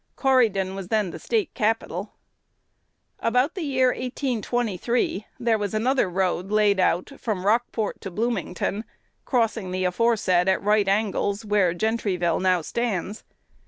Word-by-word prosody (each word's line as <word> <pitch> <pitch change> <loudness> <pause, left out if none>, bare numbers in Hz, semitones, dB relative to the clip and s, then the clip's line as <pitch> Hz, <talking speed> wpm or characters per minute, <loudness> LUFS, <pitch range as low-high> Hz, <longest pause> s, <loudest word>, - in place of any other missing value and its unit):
Corydon 220 -8 +2
was 195 -2 -6
then 210 -3 0
the - - -8
State 430 -7 -1
capital. 210 -3 -1 1.1
"About 250 +6 +1
the 375 - -5
year 260 -4 +2
1823, 240 -4 -1
there 230 -2 +1
was 205 0 -2
another 245 -1 +2
road 185 0 -1
laid 210 -2 +3
out 185 +4 +1
from 200 -5 -3
Rockport 225 0 0
to 195 - -5
Bloomington, 215 -1 -2 0.4
crossing 225 -6 0
the 185 0 -1
aforesaid 185 -2 +2
at 190 - +1
right 210 0 +3
angles, 200 +1 0
where 200 -4 +2
Gentryville 185 -5 0
now 185 -2 +3
stands. 210 -1 -3
210 Hz, 130 wpm, -24 LUFS, 190-235 Hz, 1.1 s, laid